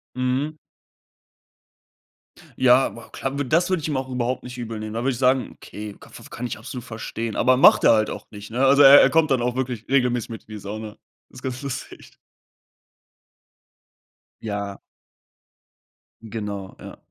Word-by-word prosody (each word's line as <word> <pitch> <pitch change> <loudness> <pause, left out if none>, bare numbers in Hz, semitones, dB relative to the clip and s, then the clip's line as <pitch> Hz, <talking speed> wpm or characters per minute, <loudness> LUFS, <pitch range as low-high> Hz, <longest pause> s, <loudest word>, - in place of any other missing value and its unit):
Mhm. 130 +5 -1 2.0
Ja, 130 +1 +4
wa 115 - -12
klar, 135 +1 -4
wü 145 - 0
das 165 +8 +2
würde 185 -4 0
ich - - -2
ihm 145 -3 -1
auch 130 0 -4
überhaupt 125 0 -2
nicht 125 0 -9
übel 115 -2 -5
nehmen. 110 0 -6
Da 115 - -2
würde 135 - +1
ich 125 - -5
sagen, 130 0 +2
okay, 105 -1 -9
ka - - -15
faf - - -13
kann 125 - -4
ich - - -5
absolut 120 +1 -8
verstehen. 115 -1 -5
Aber 130 +1 +4
macht 130 - +6
er - - +7
halt 110 -1 +2
auch - - -7
nicht, 105 -1 -10
ne? 125 +4 +1
Also, 140 +2 +5
er 140 0 +10
er - - +5
kommt 160 -1 +3
dann 130 -3 +1
auch 125 0 -1
wirklich 125 -4 -4
regelmäßig 125 -3 +1
mit 115 - -7
in 110 - -12
die - - -6
Sauna. 105 +2 -7 0.3
Ist 125 - -14
ganz 130 -1 -4
lustig. 135 -2 -8 2.3
Ja. 100 -2 -4 1.4
Genau, 105 -4 -6
ja. - - -10
125 Hz, 175 wpm, -23 LUFS, 110-130 Hz, 2.3 s, er